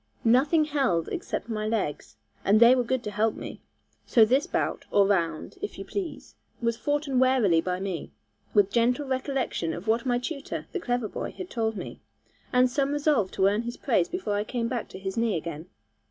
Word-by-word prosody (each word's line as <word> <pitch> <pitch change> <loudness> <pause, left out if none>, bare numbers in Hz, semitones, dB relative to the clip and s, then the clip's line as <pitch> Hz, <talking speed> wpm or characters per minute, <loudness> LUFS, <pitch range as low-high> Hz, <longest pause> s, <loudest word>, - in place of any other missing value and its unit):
Nothing 280 +7 +4
held 265 - 0
except - - -4
my 215 -2 -2
legs, 215 -10 -2 0.3
and 205 +2 +4
they 235 +2 +8
were 255 -1 +2
good 255 +1 -1
to 210 - -4
help 215 +2 +1
me. - - -8 0.5
So 225 -3 +6
this 265 +9 +2
bout, - - -1
or 200 -1 +4
round, 170 -6 -1
if 415 - -5
you - - -6
please, 380 -5 -5 0.3
was 230 -1 0
foughten 290 +1 0
warily 250 -11 +4
by 180 +1 -2
me, 190 -4 -4 0.4
with 200 -1 +3
gentle 245 +6 +2
recollection 260 - -1
of 180 +5 -8
what 230 +4 +1
my 245 -1 +2
tutor, 280 +3 -5
the 380 - -2
clever 245 -7 -1
boy, - - -5
had 370 -1 -8
told 225 -2 -1
me, - - -7 0.5
and 250 0 +5
some 275 +2 0
resolve 290 -9 +2
to 190 - +2
earn 205 +3 +3
his 240 +1 -6
praise 220 -10 +1
before 360 - -2
I 205 0 0
came 230 +1 -2
back 240 -2 -3
to - - -9
his 190 +1 -5
knee 230 -5 +1
again. 160 0 -6
235 Hz, 195 wpm, -27 LUFS, 205-265 Hz, 0.5 s, they